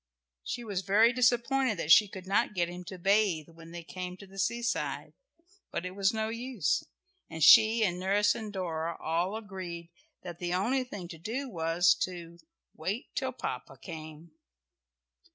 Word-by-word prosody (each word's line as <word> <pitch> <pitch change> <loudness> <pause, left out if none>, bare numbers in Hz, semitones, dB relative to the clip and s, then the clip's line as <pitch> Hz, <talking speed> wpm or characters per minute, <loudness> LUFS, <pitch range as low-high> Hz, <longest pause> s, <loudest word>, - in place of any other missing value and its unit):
She 240 - -4
was 200 -5 -3
very 215 +6 +4
disappointed 250 -1 +2
that 165 -1 -1
she 210 - +8
could 190 -1 -9
not 200 +2 +1
get 175 -1 +1
him 175 +1 -8
to 185 - -8
bathe 190 -4 +2
when 165 0 -14
they 170 0 -8
came 180 +1 -6
to 200 - -12
the 195 0 -11
seaside, 235 +4 -2 0.6
but 175 - -4
it 180 - -4
was 195 +1 +1
no 220 -1 -2
use, 230 - -1 0.5
and 160 -1 -3
she 220 +7 +8
and 180 -3 0
nurse 205 +2 +3
and 215 -2 -6
Dora 170 -4 -3
all 170 +5 -1
agreed 185 -6 -7 0.3
that 175 -2 -8
the 175 0 -1
only 250 +8 +1
thing 205 -8 -8
to 165 - -9
do 245 - -4
was 165 -4 +3
to 170 -2 -4 0.4
"wait 195 - -4
till 260 -2 -2
Papa 135 - -6
came." 155 +2 -10
185 Hz, 170 wpm, -30 LUFS, 170-220 Hz, 0.6 s, she